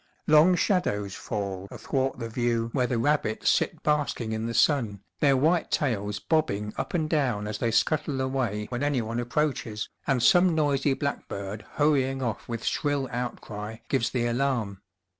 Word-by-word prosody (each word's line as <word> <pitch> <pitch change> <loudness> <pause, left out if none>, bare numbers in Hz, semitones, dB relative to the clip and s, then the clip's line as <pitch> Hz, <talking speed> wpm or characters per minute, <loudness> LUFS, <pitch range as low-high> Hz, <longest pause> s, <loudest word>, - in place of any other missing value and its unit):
Long 155 +4 +6
shadows 105 - 0
fall 100 -3 -4
athwart 135 -1 -2
the 115 -2 -4
view 115 0 -1
where 125 -2 +1
the 120 - -1
rabbits 120 -2 +1
sit - - 0
basking 145 -6 0
in 110 +1 -2
the 115 - -3
sun, 120 -6 +2 0.2
their 140 -2 +4
white 160 +5 +2
tails 105 -8 0
bobbing 105 -7 0
up - - -3
and 160 -3 +1
down 130 -10 0
as 105 0 -4
they 115 - +1
scuttle 150 +3 +1
away 130 -6 -1
when 120 -1 -3
anyone 120 -5 0
approaches, 120 -4 -1 0.2
and 130 -4 +2
some 180 +1 +5
noisy 145 -3 +2
blackbird 105 -8 -4
hurrying 135 -3 +2
off 115 -2 -3
with 115 -1 -4
shrill 145 -2 0
outcry 110 -3 -5
gives 130 -4 +1
the 120 -2 -1
alarm. 120 -5 -1
125 Hz, 160 wpm, -27 LUFS, 110-145 Hz, 0.2 s, Long